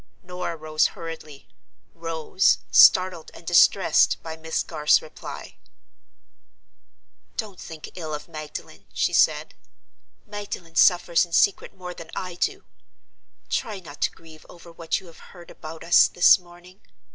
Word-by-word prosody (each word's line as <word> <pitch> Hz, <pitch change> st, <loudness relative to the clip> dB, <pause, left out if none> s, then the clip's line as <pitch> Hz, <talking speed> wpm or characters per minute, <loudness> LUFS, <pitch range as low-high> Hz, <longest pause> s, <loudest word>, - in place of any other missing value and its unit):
Norah 180 Hz, -1 st, -5 dB
rose 155 Hz, 0 st, +1 dB
hurriedly; 160 Hz, -4 st, -9 dB, 0.5 s
rose, 165 Hz, +2 st, +1 dB
startled 185 Hz, -3 st, +5 dB
and -, -, -14 dB
distressed 175 Hz, 0 st, +4 dB
by 160 Hz, -1 st, -6 dB
Miss 160 Hz, 0 st, -3 dB
Garth's 150 Hz, -2 st, +2 dB
reply. -, -, -10 dB, 1.8 s
"Don't 205 Hz, -5 st, -5 dB
think 160 Hz, -2 st, -10 dB
ill 160 Hz, -4 st, -7 dB
of 150 Hz, 0 st, -9 dB
Magdalen," 155 Hz, -1 st, -9 dB
she -, -, 0 dB
said. -, -, +2 dB, 0.7 s
"Magdalen 205 Hz, -5 st, -7 dB
suffers 175 Hz, -2 st, +4 dB
in 170 Hz, -2 st, -9 dB
secret 200 Hz, -, +2 dB
more 180 Hz, -1 st, -7 dB
than 165 Hz, -2 st, -11 dB
I 185 Hz, -1 st, -5 dB
do. 175 Hz, -, -2 dB, 0.8 s
Try 210 Hz, -3 st, -3 dB
not 150 Hz, -5 st, -13 dB
to -, -, +2 dB
grieve 160 Hz, -1 st, -16 dB
over 170 Hz, -1 st, -14 dB
what 165 Hz, 0 st, -3 dB
you 190 Hz, -, -17 dB
have 165 Hz, -2 st, -15 dB, 0.2 s
heard 175 Hz, -, -13 dB
about 160 Hz, +1 st, -10 dB
us 170 Hz, +1 st, +6 dB
this 175 Hz, +2 st, +5 dB
morning. 180 Hz, +2 st, -18 dB
170 Hz, 135 wpm, -24 LUFS, 160-180 Hz, 1.8 s, us